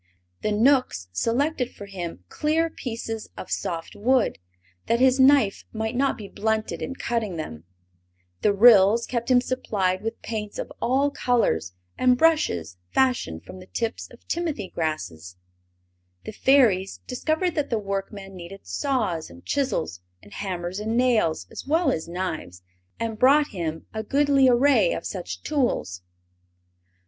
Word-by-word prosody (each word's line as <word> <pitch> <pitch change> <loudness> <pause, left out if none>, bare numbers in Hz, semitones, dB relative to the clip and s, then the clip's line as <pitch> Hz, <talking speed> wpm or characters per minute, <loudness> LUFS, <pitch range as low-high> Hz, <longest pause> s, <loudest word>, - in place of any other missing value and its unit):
The 215 - 0
Knooks 225 - +2
selected 250 - 0
for 200 - -9
him 175 - -6
clear 320 - 0
pieces 225 -4 -5
of - - -8
soft 165 -1 -3
wood, 245 - +2 0.5
that 235 - +2
his 260 +1 +4
knife 265 -6 +5
might 220 +1 -3
not 275 +2 +1
be 210 - -8
blunted 220 +1 -2
in 270 - -4
cutting 230 -7 -2
them; 85 - -6 0.8
the 210 - +4
Ryls 210 +1 +6
kept 235 -1 -3
him 250 -1 +6
supplied 200 -8 -1
with 225 +1 -4
paints 210 -2 -4
of - - -5
all 275 +4 +2
colors 90 - +1 0.3
and 250 -1 +4
brushes 90 - +2
fashioned 245 - +1
from 185 - -10
the 185 - -13
tips 230 +2 -3
of - - -18
timothy 315 - -2
grasses; 90 - -4 0.9
the - - -6
Fairies 220 -6 +3
discovered 315 +7 -1
that 295 -2 -1
the 230 - +1
workman 195 -1 -5
needed 185 +2 -10
saws 225 - -1
and 85 0 -15
chisels 90 - -1 0.2
and 100 - -15
hammers 185 -1 -4
and 220 +2 -1
nails, 235 -10 +2
as - - -8
well 320 -1 +3
as 160 - -3
knives, 165 - -5 0.4
and 225 -2 -3
brought 285 +3 +5
him 160 -4 -4
a 220 - -2
goodly 275 +2 +3
array 280 - +4
of - - -5
such - - -5
tools. 240 - -1
220 Hz, 145 wpm, -25 LUFS, 185-260 Hz, 0.9 s, Ryls